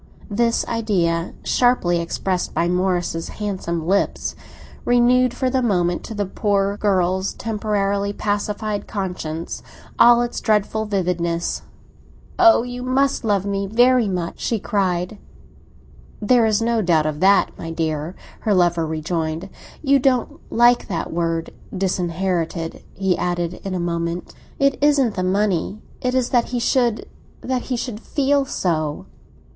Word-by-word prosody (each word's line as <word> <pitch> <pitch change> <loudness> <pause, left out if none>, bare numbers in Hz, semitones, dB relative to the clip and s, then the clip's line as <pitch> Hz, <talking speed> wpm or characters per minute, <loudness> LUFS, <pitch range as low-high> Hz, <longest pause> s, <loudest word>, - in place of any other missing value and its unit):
This 230 +2 +1
idea, 180 -7 0
sharply 245 -9 +2
expressed 180 +2 -2
by 170 - +2
Morris's 175 -2 0
handsome 185 -6 -3
lips, 195 +3 0 0.5
renewed 245 +1 +4
for 260 +2 -3
a 260 0 +1
moment, 180 -7 +1
to 225 - -7
the 205 -1 -1
poor 200 +1 0
girl's 190 -2 +1
temporarily 200 -2 -1
pacified 205 0 -2
conscience, 180 -5 -4 0.4
all 240 0 +7
its 240 - -4
dreadful 220 0 +1
vividness. 175 -4 -1 0.8
"Oh, 340 -9 +6
you 245 0 -6
must 265 +2 +1
love 205 -3 +1
me 200 0 -1
very 245 +2 +4
much!" 175 -3 -3
she 230 - 0
cried. 190 0 -1 1.0
"There 230 +1 +4
is 215 +1 +1
no 230 -1 +1
doubt 165 -5 +2
of 155 -1 -2
that, 195 +3 +4
my 165 - -7
dear!" 160 +1 -2 0.2
her 210 -2 +1
lover 175 -2 +2
rejoined. 160 +2 -3 0.3
"You 275 -1 +4
don't 255 -2 +1
like 240 +1 +4
that 170 -5 -3
word 165 -1 -1 0.3
'disinherited,'" 175 -2 -2
he 190 -2 +1
added 175 0 -2
in 195 -1 -3
a - - -1
moment. 170 0 -3 0.2
"It 275 -1 +2
isn't 280 -6 +4
the 185 - -2
money; 195 +1 0 0.2
it 250 0 0
is 255 -2 +1
that 240 -2 +3
he 245 - -3
should—that 245 +1 -1
he 255 - -3
should 235 -3 -4
feel 280 +2 +1
so." 155 - -2
200 Hz, 135 wpm, -21 LUFS, 175-235 Hz, 1.0 s, all